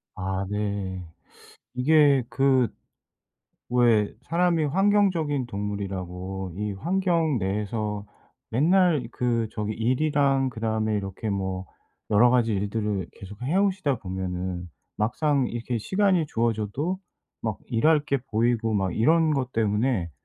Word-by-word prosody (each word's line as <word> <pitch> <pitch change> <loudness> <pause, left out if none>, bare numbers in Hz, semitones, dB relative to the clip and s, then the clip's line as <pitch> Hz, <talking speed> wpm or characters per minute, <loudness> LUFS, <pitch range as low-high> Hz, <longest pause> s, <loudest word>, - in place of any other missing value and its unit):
아 95 +1 -2
네. 100 -3 -3 0.7
이게 140 +1 +4
그 135 -3 +3 1.0
왜 115 -4 +3
사람이 170 -1 +1
환경적인 175 -5 +2
동물이라고 95 -3 -5
이 105 0 -2
환경 165 - +1
내에서 105 +1 -2 0.5
맨날 160 +1 +3
그 120 -2 0
저기 105 0 -3
일이랑 135 +3 +1
그다음에 110 -2 -1
이렇게 100 +2 -4
뭐 95 -1 -3 0.4
여러 115 +4 +5
가지 120 -3 +2
일들을 105 -1 -1
계속 100 +3 -11
해 145 +8 -1
오시다 185 - +1
보면은 90 -2 -4 0.3
막상 135 +5 +1
이렇게 120 0 -3
시간이 190 - +2
주어져도 115 - -1 0.4
막 110 -3 -2
일할 150 +6 +3
게 140 - +1 0.2
보이고 115 0 +1
막 95 -3 0
이런 160 +7 +4
것 130 -3 -1
때문에 105 -3 0
115 Hz, 245 characters per minute, -25 LUFS, 100-145 Hz, 1.0 s, 여러